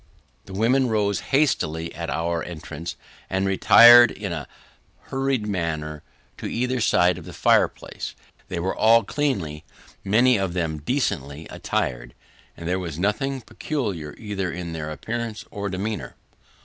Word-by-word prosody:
The 95 - -10
women 125 +6 +2
rose 105 -2 +1
hastily, 85 - +1
on 85 -2 -4
our 85 +4 -1
entrance, 85 -1 -7 0.3
and 95 +1 0
retired 120 +5 +8
in - - -5
a - - -5 0.6
hurried 135 -4 0
manner 80 -6 -3 0.4
to - - -4
either 125 +1 -1
side 90 -4 +3
of 85 - -12
the - - -9
fireplace. - - +1 0.3
They 90 - -4
were 95 +3 -1
all 115 +1 +5
cleanly 95 - -2 0.4
many 120 +4 +4
of 95 -3 -2
them 80 -4 -2
decently 75 - -2
attired, - - -3 0.4
and 85 - -7
there 90 +2 0
was 85 -5 -5
nothing 130 +9 -1
peculiar, 105 - -4
either 100 -4 -3
in 85 -1 -5
their 80 -1 -4
appearance 110 - -5
or 100 0 -4
demeanour. 100 +4 -4
95 Hz, 140 wpm, -24 LUFS, 80-115 Hz, 0.6 s, retired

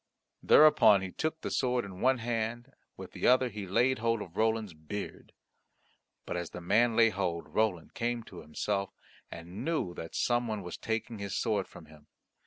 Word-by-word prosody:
Thereupon 110 -10 +6
he 95 - -5
took 160 - -2
the - - -4
sword 125 -2 0
in 95 -1 -9
one 130 +1 +4
hand, 120 +2 -3 0.2
with - - -9
the - - -1
other 130 0 +4
he 105 -3 -7
laid 125 +7 +2
hold 115 -1 0
of 85 -1 -14
Roland's 110 -3 0
beard. 80 +7 -7 0.9
But - - -4
as 85 -1 -4
the - - -8
man 115 +7 +2
laid 115 -1 +5
hold, 90 -4 -2
Roland 105 -7 0
came 120 0 -2
to 95 -5 -11
himself, 100 +5 -2 0.4
and 85 +3 -8
knew 155 - -1
that 80 -1 -8
some 120 0 +1
one 105 -3 -3
was 90 - -6
taking 110 0 -3
his 100 -1 -4
sword 105 -5 0
from 80 - -13
him. 75 -1 -18
110 Hz, 185 wpm, -30 LUFS, 90-120 Hz, 0.9 s, Thereupon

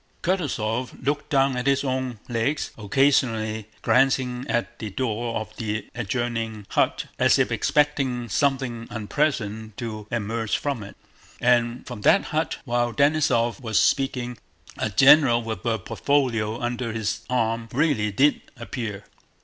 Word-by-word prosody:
Kutúzov 130 - -2
looked 145 +1 -1
down 135 -3 +3
at 125 +2 -2
his 140 0 +3
own 130 -3 -2
legs, 120 +5 -1
occasionally 110 -2 +1 0.2
glancing 130 -1 +2
at 120 0 -2
the 110 - -4
door 115 +1 -2
of 110 0 -8
the 105 -1 -3
adjoining 115 -2 -3
hut - - +1
as - - +5
if - - +1
expecting 135 -5 +1
something 125 0 0
unpleasant 110 -3 -2
to 110 -3 -6
emerge 115 -1 -1
from 140 -6 -2
it. 100 -1 -10 0.4
And 120 0 +2
from 120 -5 -7
that 195 - +5
hut, 155 -2 0
while 120 -1 0
Denísov 140 -5 +2
was 110 -4 -1
speaking, 125 -4 +1 0.4
a - - -2
general 130 +2 +6
with 110 -4 -5
a 115 -1 +2
portfolio 115 -1 0
under 120 -1 -2
his 110 -2 -2
arm 115 -2 0
really 135 -7 +1
did 140 +8 +3 0.2
appear. 110 -3 -5
120 Hz, 135 wpm, -24 LUFS, 110-135 Hz, 0.4 s, general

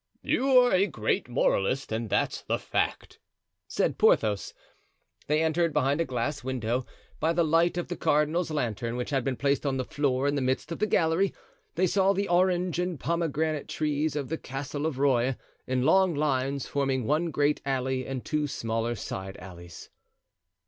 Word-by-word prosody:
"You're 255 -2 +4
a 190 +2 +4
great 120 - -1
moralist, 125 +1 +1
and 110 0 -2
that's - - 0
the - - -1
fact," - - -2 0.5
said - - -1
Porthos. 105 -2 +3 0.8
They 150 +2 +2
entered; 165 0 +1
behind 145 +1 +2
a - - +1
glass 130 +3 -3
window, 125 -1 -2 0.3
by 165 +1 +1
the 170 - +2
light 165 +2 +2
of 175 - -2
the 175 - -4
cardinal's 155 +4 +1
lantern, 120 -6 -2
which 125 +3 -4
had 135 -3 +1
been 135 0 -1
placed 140 +2 0
on 135 -2 0
the 130 - -2
floor 140 -2 0
in 145 - +1
the 140 - 0
midst 130 +5 -1
of 165 - -4
the 215 - +1
gallery, 175 +1 +2 0.4
they 185 - +2
saw 195 +2 +3
the 200 +1 -1
orange 180 -1 +2
and 180 -4 -2
pomegranate 160 -2 -1
trees 150 0 -1
of 140 -3 -3
the 160 - -3
Castle 140 +3 -4
of 150 -5 -4
Rueil, 130 -2 +2 0.3
in 130 -1 0
long 185 +3 +4
lines, 140 -2 0
forming 135 -3 -1
one 155 +6 +1
great 145 0 +1
alley 130 -1 -1
and 130 -2 -5
two 150 -1 0
smaller 115 -3 -2
side 95 -2 -6
alleys. 85 -2 -11
145 Hz, 175 wpm, -27 LUFS, 130-165 Hz, 0.8 s, You're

